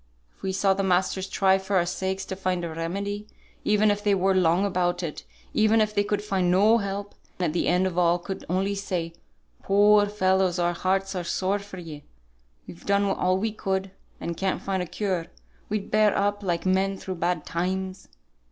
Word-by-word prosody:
If - - -31
we 190 - -2
saw 195 0 +2
the 195 - -1
masters 190 0 +1
try 190 0 +3
for 195 +1 -3
our 175 -2 +3
sakes 190 +2 -3
to 190 - -5
find 185 -2 -1
a 165 - -5
remedy, 200 +6 -4 0.4
even 210 0 +3
if 205 0 -2
they 205 -1 +3
were 190 +1 +2
long 180 +1 +3
about 180 -2 0
it, 155 -3 -5 0.3
even 220 +1 +4
if 215 -1 +1
they 205 -1 +2
could 205 0 -1
find 190 -4 0
no 210 +6 +5
help, 200 0 -4 0.2
and 180 - 0
at 155 - -1
the 175 - 0
end 180 +1 +3
of 180 -1 -1
all 175 0 +4
could 190 +2 -6
only 190 +3 0
say, 180 -4 -3 0.5
'Poor 205 +1 +5
fellows, 190 -3 +1
our 175 0 +1
hearts 190 +2 0
are 180 -2 -3
sore 190 +4 0
for 200 -1 -10
ye; 155 -4 -8 0.6
we've 170 - -12
done 200 0 +3
all 185 -1 +1
we 220 +3 -1
could, 190 -2 -2 0.3
and 170 - -4
can't 190 -1 -1
find 190 -1 -1
a 180 - -4
cure,' 185 -3 -2 0.4
we'd 210 -1 -3
bear 215 -1 +4
up 205 +1 0
like 175 -3 -2
men 190 +1 +1
through 190 - -5
bad 175 -2 -1
times. 185 +2 -3
190 Hz, 200 wpm, -26 LUFS, 180-200 Hz, 0.6 s, no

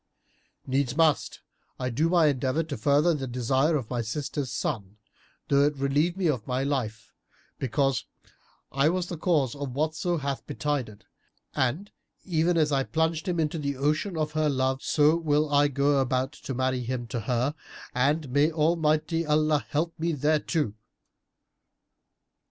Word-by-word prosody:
Needs 135 0 0
must 160 -3 +2 0.4
I 125 0 -2
do 155 +8 +1
my 175 -2 +4
endeavour 140 +2 +1
to 155 -3 -5
further 150 +4 +3
the 135 -4 -3
desire 130 +5 +1
of 130 -7 -2
my 120 -1 0
sister's 135 +2 -3
son, 105 - -3 0.5
though 140 0 +4
it 145 -1 0
relieve 145 +6 +1
me 190 - -1
of 130 -8 -1
my 130 +1 0
life; 125 -6 -3 0.5
because 135 -1 0 0.7
I 140 +3 +3
was 180 +1 0
the 175 - -4
cause 150 -9 +1
of 140 -3 -6
whatso 160 +4 0
hath 140 -2 -3
betided; 135 -8 -3 0.5
and, 140 +11 -1 0.3
even 170 -1 +1
as 155 -2 +2
I 135 -1 +2
plunged 160 +2 -1
him 175 -2 0
into 155 +1 0
the 140 -2 -2
ocean 155 +6 0
of 155 -1 -1
her 155 -1 +1
love, 130 -1 0
so 155 +1 +3
will 150 -2 +1
I 145 0 +5
go 140 0 +2
about 130 0 0
to 135 - -7
marry 130 0 0
him 120 0 -3
to 115 +1 -4
her, 125 +5 0 0.4
and 145 +4 +1
may 145 +4 +3
Almighty 160 +1 +1
Allah 155 0 +2
help 165 +3 -1
me 165 +1 0
thereto!" 150 -3 0
145 Hz, 155 wpm, -27 LUFS, 130-155 Hz, 0.7 s, I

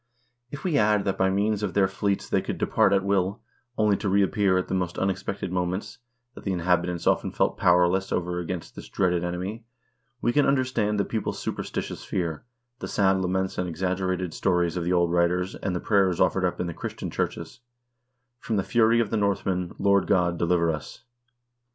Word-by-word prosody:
If 140 +1 -8
we 160 -7 +2
add 105 -1 +3
that 95 - -1
by 95 - +3
means 100 +2 0
of 105 -3 -3
their 100 -1 +4
fleets 100 +1 -2
they - - +1
could - - -4
depart - - +2
at 100 -1 +3
will, 100 +1 0 0.4
only 105 -2 +3
to 100 - -2
reappear 100 0 +2
at 95 - -1
the - - -4
most 90 -2 -1
unexpected 95 0 -2
moments, 90 +7 -3 0.3
that - - -12
the 95 - -1
inhabitants 90 -1 0
often - - +2
felt - - 0
powerless 90 +2 +3
over 90 0 -1
against 90 0 -5
this - - -10
dreaded 90 -2 +1
enemy, 90 +6 -4 0.6
we 120 - 0
can 145 +1 +3
under 135 -2 +3
stand 105 -5 0
the 100 - +1
people's 110 -2 -3
superstitious - - -4
fear, 85 -3 -3 0.4
the - - -5
sad 95 -1 +2
laments 95 +1 -1
and 90 -1 -1
exaggerated 90 0 -2
stories 90 -2 +1
of 90 - -2
the 90 - 0
old 85 -1 +2
writers, 90 +2 +1
and 95 -3 -3
the - - -1
prayers 95 -4 +2
offered 95 -1 +2
up 90 - -2
in - - -1
the 85 - -4
Christian - - -6
churches: - - -4 0.8
"From 115 - -3
the 100 - +1
fury 115 +1 +3
of 110 - -2
the 115 - +1
Northmen, 95 -3 0
Lord 100 -1 +3
God, 90 -3 +2
deliver 85 -1 +2
us 75 - -7
95 Hz, 195 wpm, -26 LUFS, 90-100 Hz, 0.8 s, their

